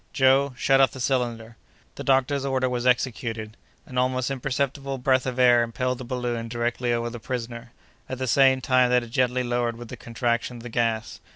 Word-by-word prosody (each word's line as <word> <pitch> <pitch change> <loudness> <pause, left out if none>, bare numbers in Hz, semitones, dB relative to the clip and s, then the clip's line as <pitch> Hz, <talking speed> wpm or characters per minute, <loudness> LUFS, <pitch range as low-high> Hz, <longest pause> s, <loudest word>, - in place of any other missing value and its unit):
"Joe, 135 0 +3
shut 135 +1 +3
off 135 -4 +3
the 130 - -9
cylinder!" 120 -3 -2 0.4
The - - -7
doctor's 135 +1 +2
order 130 -1 0
was 125 0 -1
executed. 115 -3 -1 0.3
An 125 -1 -3
almost 130 +1 0
imperceptible 135 +1 -2
breath 130 0 +1
of 130 -1 -3
air 120 -2 +5
impelled 125 +2 -2
the - - -6
balloon 120 -2 -3
directly 120 +1 -1
over 120 0 -1
the 120 - -7
prisoner, 120 0 -6 0.4
at 130 - -4
the 130 - -2
same 130 +1 +4
time 130 -1 +3
that 125 -1 +3
it 115 - -11
gently 125 0 +1
lowered 120 -1 -1
with 120 -1 -10
the - - -6
contraction 120 0 -2
of 115 - -11
the 120 - -7
gas. 115 -1 -1
125 Hz, 195 wpm, -25 LUFS, 120-130 Hz, 0.4 s, air